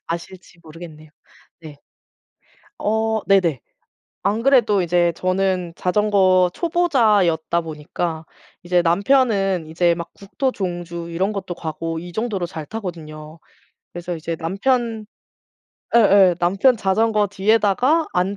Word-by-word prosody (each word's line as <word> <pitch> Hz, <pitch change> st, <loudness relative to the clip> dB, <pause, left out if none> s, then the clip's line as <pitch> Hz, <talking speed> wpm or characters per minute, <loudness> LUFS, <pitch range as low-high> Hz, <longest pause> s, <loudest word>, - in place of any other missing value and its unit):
아실지 175 Hz, +1 st, -8 dB
모르겠네요. 155 Hz, -1 st, -12 dB, 0.5 s
네. 155 Hz, -3 st, -11 dB, 1.0 s
어 220 Hz, +1 st, 0 dB
네네. 180 Hz, -9 st, +2 dB, 0.6 s
안 210 Hz, +4 st, 0 dB
그래도 235 Hz, -7 st, +3 dB
이제 175 Hz, 0 st, +2 dB
저는 185 Hz, -2 st, -1 dB
자전거 185 Hz, -2 st, +2 dB
초보자였다 215 Hz, -, +1 dB
보니까 160 Hz, +1 st, -5 dB, 0.4 s
이제 175 Hz, 0 st, +1 dB
남편은 195 Hz, -, +1 dB
이제 170 Hz, +2 st, +1 dB
막 170 Hz, 0 st, -7 dB
국토 260 Hz, +7 st, -3 dB
종주 175 Hz, -2 st, -5 dB
이런 190 Hz, +5 st, -1 dB
것도 190 Hz, -3 st, -5 dB
가고 165 Hz, 0 st, -5 dB
이 175 Hz, +1 st, -9 dB
정도로 210 Hz, -4 st, -2 dB
잘 165 Hz, -3 st, -7 dB
타거든요. 160 Hz, -5 st, -8 dB, 0.5 s
그래서 175 Hz, 0 st, -5 dB
이제 165 Hz, 0 st, -5 dB
남편 220 Hz, +6 st, -1 dB, 0.9 s
예예. 200 Hz, -5 st, +5 dB
남편 195 Hz, +9 st, +3 dB
자전거 215 Hz, +1 st, +1 dB
뒤에다가 220 Hz, -, +2 dB
안 185 Hz, +3 st, 0 dB
185 Hz, 250 characters per minute, -20 LUFS, 170-210 Hz, 1.0 s, 예예